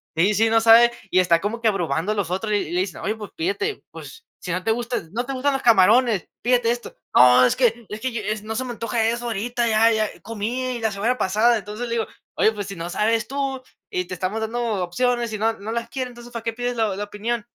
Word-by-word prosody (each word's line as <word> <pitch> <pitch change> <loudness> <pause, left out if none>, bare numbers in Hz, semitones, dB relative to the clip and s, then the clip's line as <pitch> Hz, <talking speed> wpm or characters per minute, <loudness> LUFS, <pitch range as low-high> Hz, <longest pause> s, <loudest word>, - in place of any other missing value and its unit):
Sí, 190 +6 +3
sí, 225 +2 +3
no 225 0 +4
sabe, 230 +1 +7 0.2
y 185 - +4
está 170 -2 +4
como 215 +3 -3
que, 230 - +2
abrumando 175 -1 -1
a - - -6
los 195 -5 -2
otros, 210 +3 -2
y - - +4
y 170 - -3
le 180 +1 +1
dicen: 190 -1 -5
"Oye, 215 +3 -1
pues 210 -2 -9
pídete, 395 +5 -2
pues, 455 +1 -11
si, 180 - -5
no 185 +1 -2
te 225 - +1
gustan 240 -7 -3
no 240 +2 -2
te 275 - -4
gustan 275 +2 0
los 270 - -2
camarones, 225 -1 +4 0.2
pídete 240 -1 +3
esto". 240 0 -5 0.2
"No, 125 0 +7
es - - +2
que 235 -2 +1
es 210 +1 -7
que, 215 -4 -2
no, 220 +1 -5
se 260 - -1
me 245 - -5
antoja 230 -1 -1
eso 240 +1 -2
ahorita, 235 +2 -1
ya 225 +1 +4
ya 215 -1 +1
comí, 235 +3 -3
la 220 -1 0
semana 225 +6 0
pasada". 220 +5 +3
Entonces 210 +4 -6
le 230 - -3
digo: 225 - -1 0.3
"Oye, 220 - +3
pues, 205 -2 -5
si 195 - -7
no 170 +1 -5
sabes 220 +4 0
tú, 275 -1 -2 0.3
y 180 0 -1
te 180 - -7
estamos 190 +6 -3
dando 225 -3 -2
opciones, 240 +5 0
y - - -2
no 225 +2 +1
no 215 +3 -5
las 235 0 -3
quieres, 255 -2 -4
¿entonces 240 0 -13
para 230 - -4
qué 230 - -2
pides 245 +1 -3
la 220 -4 0
la 205 - -3
opinión?". 220 +3 -3
225 Hz, 255 wpm, -22 LUFS, 205-240 Hz, 0.3 s, sabe